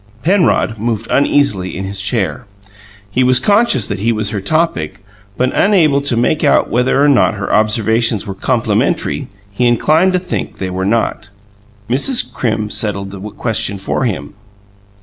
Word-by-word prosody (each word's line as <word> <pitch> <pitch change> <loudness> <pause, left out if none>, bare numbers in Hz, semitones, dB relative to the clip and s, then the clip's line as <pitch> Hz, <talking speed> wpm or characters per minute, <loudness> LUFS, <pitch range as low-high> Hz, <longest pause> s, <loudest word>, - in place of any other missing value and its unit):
Penrod 170 - +2
moved 115 -1 -2
uneasily 120 -11 +1
in 95 - -4
his 100 +1 -5
chair; 100 -7 -2 0.6
he 130 +5 +1
was 125 0 +4
conscious 205 - +2
that - - -4
he 115 +4 +1
was 110 -2 -1
her 105 -3 -3
topic 100 - -1 0.3
but 125 +1 0
unable 160 -9 +3
to 140 -4 0
make 120 +6 +1
out 145 - +3
whether 125 +3 +2
or - - +4
not 130 -5 +3
her 100 - -3
observations 110 0 +1
were 100 - -5
complimentary; 125 - -1 0.2
he 120 +5 +1
inclined 155 +10 +3
to - - +3
think 180 0 -5
they 95 -1 -4
were 95 +1 -2
not. 105 -1 -1 0.6
Mrs. 145 - +1
Crim 110 -3 -2
settled 100 -3 -2
the 100 - -9
question 105 -1 -2
for 95 +6 -2
him. 85 - -4
115 Hz, 160 wpm, -15 LUFS, 100-140 Hz, 0.6 s, was